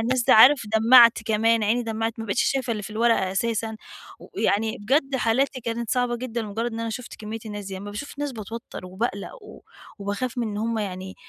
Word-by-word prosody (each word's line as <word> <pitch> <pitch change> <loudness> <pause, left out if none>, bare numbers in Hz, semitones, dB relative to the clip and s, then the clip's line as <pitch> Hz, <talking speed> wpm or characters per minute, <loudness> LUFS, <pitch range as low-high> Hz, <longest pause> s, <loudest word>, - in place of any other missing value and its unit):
الناس 245 +2 +1
ده - - +5
عارف 260 +5 +7
دمَّعت 235 +1 +7
كمان، 225 +1 +2
عيني 235 +4 +1
دمَّعت 225 0 -2
ما 225 - -4
بَقيتش 225 +3 0
شايفة 260 -3 -1
اللي 215 -2 -2
في 210 - -8
الورقة 220 -4 +1
أساسًا، 220 +2 -2 0.4
و - - -13
يعني 220 +3 +1
بجد 270 +5 +1
حالاتي 255 +3 0
كانت 230 -1 -4
صعبة 245 -1 0
جدًا، 240 -1 -4
لمجرد 225 +3 -3
إن 225 - -5
أنا 230 0 -3
شُفْت 240 +2 -7
كِميّة 220 +1 -6
الناس 205 -1 -6
دي، 190 -1 -6
أما 200 +2 -7
باشوف 280 +8 -8
ناس 290 -1 -3
باتوتر 225 -3 -8
وباقلق، 200 - -5
و - - -13 0.4
وباخاف 205 +5 -4
من 235 -2 -1
إن 205 - -5
هم 225 +1 -1
يعني 190 -2 -5
225 Hz, 205 wpm, -24 LUFS, 210-240 Hz, 0.4 s, عارف